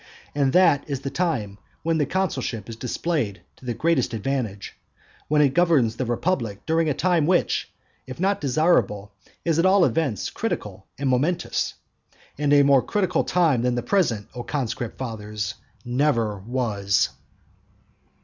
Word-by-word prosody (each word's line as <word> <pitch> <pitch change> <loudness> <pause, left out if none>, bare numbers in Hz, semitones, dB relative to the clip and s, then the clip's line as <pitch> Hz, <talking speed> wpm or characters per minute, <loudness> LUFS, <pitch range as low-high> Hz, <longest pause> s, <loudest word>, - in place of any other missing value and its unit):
And 140 -2 +2
that 170 -6 +5
is 140 -3 -3
the 135 - -4
time 115 - -2 0.2
when 165 0 +1
the 145 - +1
consulship 135 - -2
is 115 - -7
displayed 125 - -2 0.2
to - - -16
the 120 -2 -2
greatest 150 -7 +1
advantage, 110 -3 -3 0.5
when 150 0 +4
it 135 -2 +2
governs 155 -10 +3
the 125 0 -3
republic 120 - -1
during 160 0 +2
a 145 - 0
time 175 -4 +2
which, 180 -1 +1 0.4
if 130 +2 -8
not 195 +2 +1
desirable, 125 - +1 0.3
is 165 -1 +2
at 170 - +3
all 190 -1 +5
events 140 - -1
critical - - -4
and 140 - -2
momentous. 140 +8 0 0.6
And 145 -1 +1
a 145 -1 +6
more 140 -2 +5
critical 185 -1 0
time 160 -9 +2
than 125 0 +1
the 120 - -2
present, 120 - +1
O 125 - -5
conscript 120 -4 -3
fathers, 105 -4 -4 0.3
never 120 -5 +1
was. 105 -3 0
135 Hz, 150 wpm, -24 LUFS, 115-165 Hz, 0.6 s, a